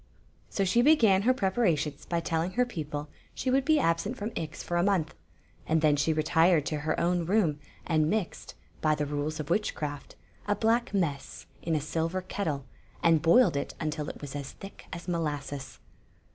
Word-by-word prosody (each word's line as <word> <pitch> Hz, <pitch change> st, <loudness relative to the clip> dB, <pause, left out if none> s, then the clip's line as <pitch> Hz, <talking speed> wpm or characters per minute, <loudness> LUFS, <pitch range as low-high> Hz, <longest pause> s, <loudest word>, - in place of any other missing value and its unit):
So 195 Hz, -, 0 dB
she 235 Hz, +6 st, +3 dB
began 230 Hz, -9 st, +5 dB
her 240 Hz, +5 st, +4 dB
preparations 180 Hz, -, 0 dB
by 170 Hz, -1 st, 0 dB
telling 165 Hz, +2 st, -1 dB
her 250 Hz, +1 st, +2 dB
peo 170 Hz, -11 st, -5 dB
ple 145 Hz, 0 st, -5 dB, 0.3 s
she 255 Hz, -, -1 dB
would 270 Hz, +1 st, +3 dB
be 310 Hz, +2 st, +4 dB
absent 200 Hz, -, 0 dB
from 210 Hz, +3 st, -4 dB
Ix 155 Hz, -2 st, -5 dB
for 175 Hz, -, -2 dB
a -, -, +3 dB
month, 185 Hz, -5 st, +1 dB, 0.5 s
and 160 Hz, 0 st, +2 dB
then 150 Hz, -2 st, +4 dB
she 145 Hz, +3 st, +1 dB
retired 160 Hz, +1 st, +3 dB
to 155 Hz, -1 st, -2 dB
her 155 Hz, +1 st, -1 dB
own 175 Hz, 0 st, +1 dB
room 175 Hz, -7 st, +2 dB, 0.3 s
and 155 Hz, -2 st, +2 dB
mixed, 210 Hz, -2 st, -3 dB, 0.3 s
by 155 Hz, -1 st, +3 dB
the 150 Hz, -, -1 dB
rules 145 Hz, +2 st, -3 dB
of 155 Hz, +1 st, -4 dB
witchcraft, 150 Hz, -8 st, -2 dB, 0.3 s
a 205 Hz, -, +2 dB
black 230 Hz, +3 st, +1 dB
mess 165 Hz, -9 st, -2 dB, 0.2 s
in 165 Hz, -1 st, -1 dB
a -, -, +2 dB
silver 165 Hz, +5 st, -2 dB
ketde, 160 Hz, -7 st, -3 dB, 0.4 s
and 165 Hz, -2 st, +5 dB
boiled 175 Hz, -, +5 dB
it 140 Hz, -, -3 dB
until 155 Hz, -2 st, -3 dB
it -, -, -8 dB
was 145 Hz, -1 st, -7 dB
as 140 Hz, -2 st, -5 dB
thick 195 Hz, -, -12 dB
as 170 Hz, +1 st, -7 dB
molasses. 145 Hz, -5 st, -3 dB
165 Hz, 185 wpm, -29 LUFS, 150-195 Hz, 0.5 s, began